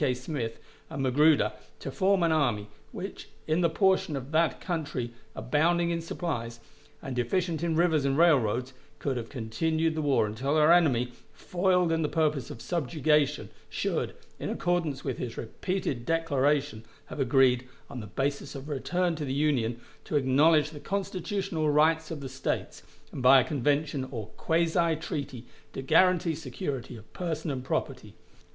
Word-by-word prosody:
K. 130 -3 +2
Smith 125 -3 -4 0.3
and 135 - -3
Magruder 135 -4 +4 0.2
to 135 - -6
form 190 +3 +2
an 165 - +3
army, 120 -10 +1 0.2
which - - -7 0.2
in 160 +3 +1
the 170 - +3
portion 190 -3 +2
of 135 +1 -6
that 160 +1 +2
country 145 -9 -3 0.2
abounding 165 +9 +1
in 165 0 -1
supplies, 120 -9 -4 0.4
and 135 -2 -5
deficient 160 +6 0
in 170 -2 0
rivers 160 -3 +3
and 140 0 +1
railroads, 130 -6 +3 0.2
could 135 +7 -2
have 115 -2 -5
continued 160 +7 -1
the 155 - -2
war 140 -6 +2
until 130 +8 -1
our 155 +1 +5
enemy, 130 -8 +3 0.2
foiled 180 -1 +1
in 165 0 +1
the 150 - 0
purpose 150 -5 0
of 115 - -9
subjugation, 150 -2 +1 0.2
should, - - -2 0.2
in - - -3
accordance 170 -6 -1
with 130 -4 -3
his 120 -2 -5
repeated 135 - -3
declaration, 145 -5 +1 0.2
have - - -9
agreed, 130 -1 +3 0.2
on 130 - -7
the 105 - -7
basis 140 +6 -3
of 135 +1 -7
a 150 - -3
return 175 +5 0
to 155 - -4
the 135 - -3
Union, 130 -6 +1 0.2
to - - -4
acknowledge 145 +3 +4
the 150 - -9
Constitutional 190 -3 -2
rights 155 +2 +3
of 160 -3 -5
the 135 - -5
States, 130 +1 -3 0.3
and - - -6
by 130 +2 +8
a - - +3
convention, 145 -1 0
or 110 -5 -6
quasi 165 0 +1
treaty, 140 -5 -5 0.3
to 135 - -5
guarantee 170 +3 +4
security 130 -4 -5
of 110 - -16
person 160 -3 -3
and 130 -2 -4
property. - - -3
150 Hz, 165 wpm, -28 LUFS, 130-165 Hz, 0.4 s, by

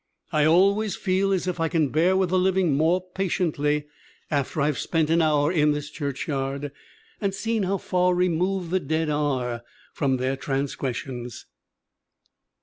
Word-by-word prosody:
"I 155 -3 +3
always 195 +5 +3
feel 195 0 0
as 190 -2 0
if 180 -1 -2
I 165 - +2
can 160 -3 +1
bear 170 +7 +3
with 190 -2 +1
the 185 +1 +2
living 185 -3 +2
more 165 +5 +2
patiently 150 -6 0 0.5
after 145 +1 -1
I've 145 -1 +1
spent 160 -2 0
an 165 +1 +4
hour 150 -1 +2
in 150 -4 +3
this 145 0 -5
churchyard 140 -1 -3 0.5
and 195 -2 -1
seen 225 +2 -1
how 195 +1 0
far 180 -1 +1
removed 180 0 0
the 185 - +2
dead 160 0 -1
are 130 -5 -1 0.3
from 135 -3 0
their 130 +1 -1
transgressions. 130 -3 -4
160 Hz, 150 wpm, -25 LUFS, 145-185 Hz, 0.5 s, an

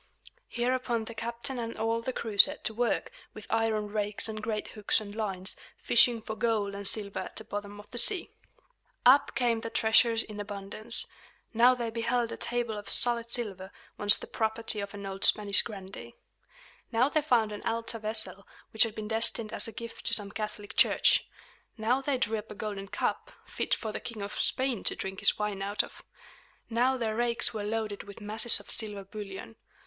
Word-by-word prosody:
Hereupon 240 -2 -1
the 230 - -8
captain 235 +3 -5
and 230 0 -5
all 225 +1 0
the 260 - -3
crew 220 -5 -5
set 290 +7 +7
to 220 - -1
work, 235 0 -1 0.2
with 215 - -10
iron 220 -2 0
rakes 210 0 -2
and 215 -1 -6
great 215 -1 -3
hooks 210 0 0
and 205 -2 -9
lines, 195 -4 -3 0.2
fishing 235 -1 +4
for 220 - -5
gold 220 -4 0
and 200 0 -3
silver 200 -2 -1
at - - -7
the - - -6
bottom 205 0 -7
of 205 - -13
the 240 - +2
sea. 385 - +5 0.7
Up 270 +3 +5
came 235 -3 +1
the 230 - -5
treasures 225 +1 +3
in 210 -1 -9
abundance. 205 +2 -2 0.5
Now 245 +3 +5
they 235 -2 -4
beheld 235 +1 -1
a - - -4
table 240 -2 -2
of 205 - -11
solid 235 -1 +7
silver, 200 -6 -5 0.3
once 205 0 +7
the - - -8
property 220 -1 -2
of 200 0 -6
an 200 -1 -8
old 195 0 -6
Spanish 205 -2 +6
grandee. 190 - -9 0.8
Now 235 +2 +3
they 310 +1 +1
found 240 -7 +2
an 210 - -7
altar 230 0 -3
vessel, 215 -3 -5 0.3
which 220 - -1
had 225 -2 +4
been 215 -1 -5
destined 225 0 0
as - - +1
a - - -7
gift 230 +1 -8
to - - +6
some 200 -2 -2
Catholic 210 -1 -6
church. - - +4 0.5
Now 235 +5 +1
they 275 -1 -1
drew 220 -2 0
up 210 - -12
a 210 - -9
golden 200 -2 -5
cup, - - -3
fit - - -1
for 220 - -5
the - - -5
King 220 -4 -7
of 200 - -6
Spain 260 -5 0
to - - +1
drink 190 0 -5
his - - +3
wine 210 -2 -3
out 200 +1 0
of. - - -13 0.7
Now 250 +3 +2
their 220 -3 -2
rakes 235 0 +1
were 215 -2 -4
loaded 210 -1 -3
with 200 +1 -12
masses 220 +2 +4
of - - -11
silver 210 -3 -1
bullion. 205 +2 -9
220 Hz, 195 wpm, -29 LUFS, 205-235 Hz, 0.8 s, set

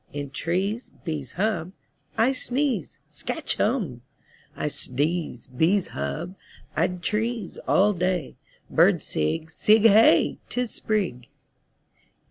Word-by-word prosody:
In 145 -1 -5
trees 190 - -2
Bees 150 -7 -4
hum 185 -3 -1 0.4
I 235 +4 +4
sneeze 265 +1 -1
Skatch 320 - -3
Humb!! 205 - 0 0.5
I - - -3
sdeeze. 150 -1 -2
Bees 175 +7 +2
hub. 175 +4 -4 0.4
Id 175 +2 0
trees 220 0 -2
All 205 +2 +4
day 180 -4 -1 0.3
Birds - - +4
sig. 155 - -2
Sig 215 +6 +4
Hey! 225 0 +6
'Tis 245 -2 -2
Sprig! 185 - -2
185 Hz, 105 wpm, -25 LUFS, 160-220 Hz, 0.5 s, Hey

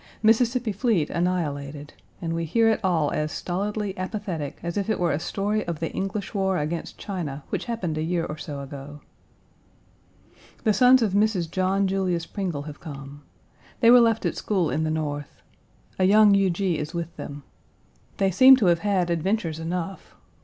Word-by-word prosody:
Mississippi 235 +1 +3
fleet 200 - 0
annihilated, 150 -5 -2 0.3
and 165 0 -2
we 165 0 -2
hear 225 +8 +2
it 220 - 0
all 165 -6 +1
as 150 0 -1
stolidly 200 +2 -3
apathetic 185 -6 -4
as 170 0 -3
if 200 +1 -2
it 220 - 0
were 175 -2 +1
a 145 - 0
story 205 +5 -1
of 170 -3 -3
the 165 - -3
English 195 +2 -4
war 190 -2 +1
against 155 +3 -4
China 155 -8 -5
which - - -3
happened 185 -10 -3
a - - -1
year 170 0 -1
or 150 - -5
so 145 -2 -6
ago. 140 +1 -9 1.6
The 215 - +3
sons 250 +2 +6
of 205 -4 0
Mrs. 200 -5 +1
John 190 +2 +1
Julius 185 -3 0
Pringle 180 -8 -4
have 150 -1 -9
come. 140 -2 -9 0.6
They 230 - +5
Page - - +9
187 - - +9
were 250 - +8
left 225 -1 -2
at - - 0
school 185 -7 0
in 160 - 0
the - - -1
North. 145 -2 -4 0.6
A 185 - +4
young 210 +1 +6
Huger 195 -1 +2 0.2
is 150 +4 -6
with 170 -1 -4
them. 145 0 -7 0.7
They 195 -1 +2
seem 260 +9 +8
to 245 -6 0
have 170 - -4
had 190 -3 0
adventures 170 -1 -1
enough. 175 +3 -5
180 Hz, 180 wpm, -25 LUFS, 155-205 Hz, 1.6 s, Page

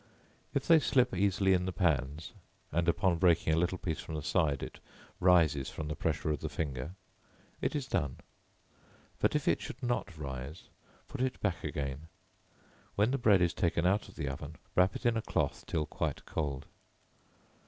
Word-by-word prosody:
If - - +1
they 165 -2 +7
slip 125 -6 +2
easily 95 0 +3
in 90 0 +2
the - - -1
pans, 80 -4 0 0.4
and, 85 +2 +2
upon 85 0 +2
breaking 85 -3 +4
a - - +3
little 90 +2 +1
piece 80 -4 -3
from 80 - -6
the 75 - -4
side, 75 -3 +1
it - - -7 0.4
rises 80 -7 +4
from 75 -1 -5
the 75 - -2
pressure 80 - -1
of 75 - -1
the 80 - -4
finger, 70 +2 -4 0.7
it - - 0
is 145 -3 -1
done; 70 - -1 1.0
but - - +2
if - - 0
it - - +3
should 130 +3 -8
not 120 -9 -1
rise, 70 +2 -6 0.4
put 135 - -5
it 130 0 -1
back 100 -4 -1
again; 75 0 -4 0.9
when 105 +4 +3
the 135 - 0
bread 100 -6 +5
is 85 - +2
taken 85 -1 +1
out 100 +4 +2
of - - -15
the 70 - -3
oven, 70 +3 -5 0.2
wrap 95 +1 +4
it - - -6
in 120 -1 +4
a - - 0
cloth - - -1
till 75 - 0
quite - - -3
cold. 70 -3 -3
85 Hz, 185 wpm, -32 LUFS, 75-95 Hz, 1.0 s, they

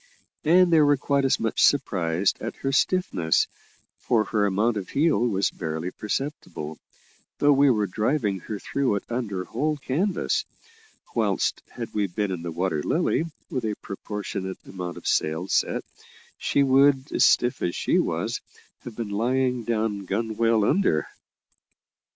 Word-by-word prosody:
And 175 +2 +5
they 160 - +6
were 145 -1 +4
quite 140 +1 +1
as 135 - +2
much 115 - -1
surprised 95 - +2
at - - -4
her 135 - +2
stiffness, 135 - +2 0.5
for 115 -3 +2
her 105 -1 +1
amount 105 +4 +1
of 95 - -5
heel 155 +2 +2
was 105 -5 +1
barely 80 +1 -4
perceptible, 105 - -4 0.6
though 145 0 +5
we 140 0 +5
were 105 -4 +2
driving 105 +1 0
her 105 +4 -6
through 130 +2 -1
it 100 - -3
under 105 -6 -2
whole 150 +6 -1
canvas; 170 +8 0 0.7
whilst - - 0
had 115 -2 -7
we 105 -1 +1
been 100 +2 -2
in 90 -3 -4
the 85 0 -4
Water 85 -2 -1
Lily, 165 - +1 0.3
with 130 -3 -2
a 110 -2 -1
proportionate 100 -2 -5
amount 90 -2 -6
of - - -11
sail 80 +4 0
set, - - +1 0.6
she 140 - +2
would, 135 +1 +3
stiff 120 0 +4
as 85 - -1
she - - +1
was, - - -1 0.4
have 120 - -10
been 115 -2 -4
lying 125 +3 0
down 110 -3 -1
gunwale 110 +1 +1
under. 185 - +2
110 Hz, 150 wpm, -25 LUFS, 95-135 Hz, 0.7 s, they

